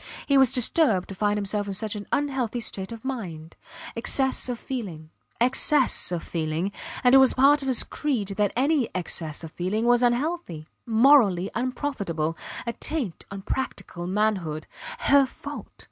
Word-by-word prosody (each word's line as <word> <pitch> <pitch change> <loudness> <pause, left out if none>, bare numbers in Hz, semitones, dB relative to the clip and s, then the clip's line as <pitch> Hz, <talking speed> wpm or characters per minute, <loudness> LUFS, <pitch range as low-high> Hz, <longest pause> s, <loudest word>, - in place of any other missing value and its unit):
He 280 - +2
was 265 -3 +6
disturbed 245 - +2
to - - -5
find 205 +2 0
himself 205 0 -2
in 195 - -1
such 215 +1 -2
an 205 -1 -7
unhealthy 265 -5 -1
state 195 -3 -3
of 230 +1 -9
mind. 175 -12 -6 0.4
Excess 260 +3 +2
of 245 - -2
feeling 180 -13 -6 0.3
excess 260 -1 +2
of 175 -2 -3
feeling; 165 +3 -2 0.3
and 250 0 +5
it 270 - +9
was 265 -1 +5
part 285 +3 +5
of 270 - -5
his 255 -3 +3
creed 250 -10 -2
that 200 0 0
any 275 0 +2
excess 165 -3 -3
of 160 - -8
feeling 195 +7 -2
was 240 0 +4
unhealthy 245 - -1 0.2
morally 225 -6 +4
unprofitable; 215 - -2 0.3
a 235 - -2
taint 255 - -3
on 195 -1 -8
practical 185 -8 -4
manhood. 185 -6 -1 0.4
Her 280 -1 +5
fault. - - -8
220 Hz, 160 wpm, -25 LUFS, 185-265 Hz, 0.4 s, it